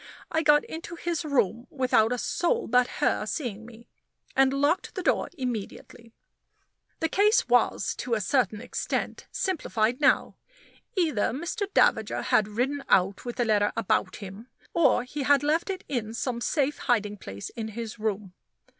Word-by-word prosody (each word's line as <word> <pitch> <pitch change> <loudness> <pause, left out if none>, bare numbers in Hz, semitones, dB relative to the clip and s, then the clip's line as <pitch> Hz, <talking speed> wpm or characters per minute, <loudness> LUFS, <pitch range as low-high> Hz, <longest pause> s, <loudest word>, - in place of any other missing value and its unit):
I 320 - +1
got 295 -1 +5
into 335 +1 -7
his 340 0 -2
room 240 -5 0
without 250 -4 +2
a 250 - 0
soul 460 - 0
but 250 +1 +3
her - - +1
seeing 225 -7 -4
me, 235 0 -14 0.5
and 270 0 +4
locked 285 +6 0
the 370 - -3
door - - +1
immediately. 235 -2 -6 0.9
The 325 - +2
case 415 - +3
was, 245 -1 +2
to 245 -2 -1
a - - 0
certain 220 0 +1
extent, 250 - -3
simplified 245 - -1
now. 285 - +3 0.6
Either 310 - +2
Mr. 370 - -3
Davager 220 -1 +3
had 215 -1 +3
ridden 260 +7 -2
out 190 +3 +2
with 240 - -4
the 240 - 0
letter 210 -2 +2
about 195 -3 0
him, 200 +3 -9 0.3
or 330 -7 +3
he 280 +4 -6
had 285 +1 +4
left 315 +6 +1
it 380 -1 -4
in 230 -4 -3
some 240 -1 -2
safe 290 +2 0
hiding 210 -5 0
place 100 - -7
in 225 -2 -5
his 225 +1 -6
room. 210 -3 -3
245 Hz, 160 wpm, -27 LUFS, 220-295 Hz, 0.9 s, got